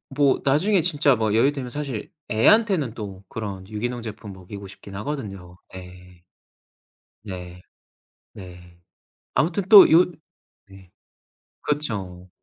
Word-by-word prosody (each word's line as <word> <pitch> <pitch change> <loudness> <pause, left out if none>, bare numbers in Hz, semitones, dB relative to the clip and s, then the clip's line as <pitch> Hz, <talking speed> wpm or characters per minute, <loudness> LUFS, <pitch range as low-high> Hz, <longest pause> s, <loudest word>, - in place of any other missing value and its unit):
뭐 140 -1 +3
나중에 175 +8 +2
진짜 145 -5 +2
뭐 110 -2 -1
여유 115 +6 +3
되면 130 -4 -6
사실 140 -6 -5 0.2
애한테는 170 - +3
또 100 -4 -8
그런 100 -4 -6
유기농 120 +3 -4
제품 110 -2 -8
먹이고 95 +1 -10
싶긴 95 +1 -13
하거든요. 100 -9 -6 0.2
네. 90 -1 -13 1.0
네. 90 -3 -9 0.7
네. 90 -2 -13 0.5
아무튼 175 +5 0
또 210 -3 +9
요 170 +3 +7 0.6
네. 95 -2 -16 0.7
그쵸. 95 -11 -3
105 Hz, 215 characters per minute, -23 LUFS, 95-145 Hz, 1.0 s, 또